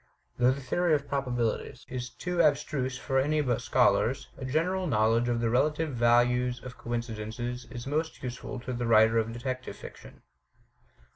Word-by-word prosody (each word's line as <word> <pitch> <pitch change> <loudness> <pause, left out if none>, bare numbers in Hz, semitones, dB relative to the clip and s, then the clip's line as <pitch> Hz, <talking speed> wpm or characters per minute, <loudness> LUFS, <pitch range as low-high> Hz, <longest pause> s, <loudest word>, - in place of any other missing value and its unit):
Though 125 0 +5
the 135 +2 -1
theory 165 +5 +2
of 140 -1 -3
probabilities 125 -5 -2
is 125 -1 -5
too 180 +4 -1
abstruse 140 -4 +1
for 135 0 0
any 150 +3 +1
but 125 -5 0
scholars, - - +2
a 130 - -7
general 180 +7 0
knowledge 115 -1 +2
of 120 -1 0
the 115 - +1
relative 150 +4 +1
values 120 +1 +3
of 125 -1 -8
coincidences 120 +1 -4
is 120 -2 -7
most 155 +3 -2
useful 125 +1 -5
to 125 +1 -5
the 120 -1 -2
writer 110 0 +5
of 115 0 -1
detective 130 +2 -5
fiction. - - -12
125 Hz, 160 wpm, -29 LUFS, 120-140 Hz, -, Though